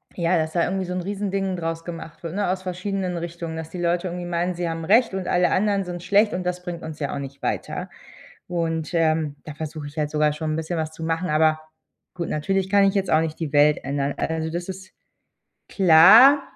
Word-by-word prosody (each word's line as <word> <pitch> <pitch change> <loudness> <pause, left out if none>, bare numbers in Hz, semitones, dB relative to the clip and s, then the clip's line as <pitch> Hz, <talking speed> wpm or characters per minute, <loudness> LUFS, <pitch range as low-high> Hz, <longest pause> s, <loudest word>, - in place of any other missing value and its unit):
Ja, 170 0 +1
dass 160 -1 -1
da 170 - +2
irgendwie 190 0 -2
so 180 - -4
'n 180 - -2
riesen 200 +2 -3
Ding 195 -1 -1
draus 165 -1 -4
gemacht 165 -1 -8
wird, 165 +1 -5
ne, 200 -2 0
aus 185 0 -1
verschiedenen 185 0 -3
Richtungen, 170 -1 -5
dass 160 -1 -6
die 180 - -5
Leute 175 +1 0
irgendwie 175 0 -5
meinen, 175 +1 -1
sie 175 -1 -3
haben 165 0 -4
recht 225 +5 +4
und 190 -2 -4
alle 180 0 +2
anderen 200 0 +1
sind 175 -1 -6
schlecht 205 +4 +3
und 180 - -2
das 180 0 -3
bringt 175 -2 -6
uns 160 -1 -7
ja 145 -2 -2
auch - - -3
nicht 140 0 -8
weiter. - - -3 0.6
Und, 165 -2 -2
ähm, 155 -3 +1
da 155 - -8
versuche 155 0 -6
ich 145 +2 -13
halt 150 -1 0
sogar 150 0 +1
schon 155 0 -3
'n - - -1
bisschen 160 +2 -3
was 155 0 -3
zu 160 - -9
machen, 165 +3 -1
aber 155 +1 +3 0.6
gut, 170 -2 -4
natürlich 190 +5 -1
kann 200 0 +5
ich 195 +1 +1
jetzt 195 -2 0
auch 155 - +4
nicht 160 -1 -4
die 155 -3 -4
Welt 145 +1 +5
ändern. 140 +1 -1
Also, 160 0 -2
das 175 +2 -4
ist 190 0 -8 0.8
klar. 200 - +7
170 Hz, 230 wpm, -23 LUFS, 160-185 Hz, 0.8 s, klar